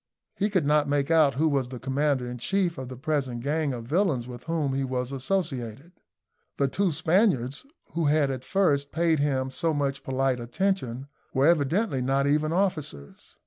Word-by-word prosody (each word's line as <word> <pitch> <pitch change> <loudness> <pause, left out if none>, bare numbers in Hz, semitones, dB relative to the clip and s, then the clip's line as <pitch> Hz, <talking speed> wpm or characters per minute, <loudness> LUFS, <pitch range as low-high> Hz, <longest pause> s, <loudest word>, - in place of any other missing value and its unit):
He 205 +1 0
could 185 -7 +1
not 150 0 +3
make 145 +1 +1
out 155 -4 +4
who 155 +4 +2
was 140 -4 +1
commander 130 +1 -1
in 125 0 -6
chief 180 +2 0
of 130 -1 -6
the 130 - -8
present 135 -4 -2
gang 150 +1 0
of 120 -3 -5
villains 150 - +1
with 125 -1 -9
whom 155 -5 -1
he 135 0 0
was 130 -1 -2
associated. 135 - -3 0.7
The 140 - +2
two 190 +6 0
Spaniards, 160 - +1 0.3
who 165 -1 0
had 145 -1 +3
at 130 -1 -5
first 145 -7 +1
paid 165 -1 +2
him 135 -2 0
so 160 +4 0
much 140 -1 -1
polite 130 -1 0
attention, 130 -1 -2 0.3
were 135 +1 +3
evidently 165 - +2
not 135 +2 +1
even 150 +2 +2
officers. 160 - -3
140 Hz, 175 wpm, -26 LUFS, 130-165 Hz, 0.7 s, out